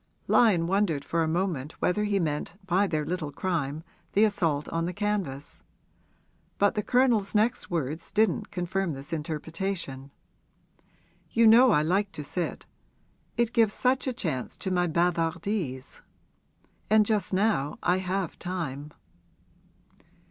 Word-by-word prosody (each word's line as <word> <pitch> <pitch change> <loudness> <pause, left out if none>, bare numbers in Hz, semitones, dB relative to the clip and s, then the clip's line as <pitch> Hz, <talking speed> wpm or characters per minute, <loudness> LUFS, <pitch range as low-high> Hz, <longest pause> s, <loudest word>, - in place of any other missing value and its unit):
Lyon 200 -9 +4
wondered 175 -6 0
for 165 - 0
a 160 - +1
moment 160 -4 -1
whether 210 +3 0
he 205 -1 +1
meant 155 0 -2
by 190 +2 +2
their 155 -4 -1
little 160 -2 -3
crime 155 -2 -2 0.3
the 205 - +4
assault 170 -9 +1
on 165 0 -1
the 180 - -3
canvas; 190 -9 -3 0.9
but 205 0 +3
the 210 - -1
Colonel's 235 -4 +2
next 225 +4 +1
words 160 -1 -3
didn't 215 0 +1
confirm 180 -1 -2
this 140 +5 -7
interpretation. 160 -2 -4 1.2
'You 230 0 +3
know 235 +4 +8
I 150 -9 +4
like 195 +5 +1
to 150 - -5
sit 165 +5 -4 0.7
it 235 0 +1
gives 225 -3 +3
such 260 +2 +1
a - - +1
chance 155 - -3
to 190 - -3
my 180 -1 +2
bavardise. 170 -3 -1 0.9
And 215 0 +5
just 210 -1 0
now 190 -7 +1
I 180 - +3
have 185 -1 -3
time.' 150 -5 -5
180 Hz, 135 wpm, -27 LUFS, 155-205 Hz, 1.2 s, know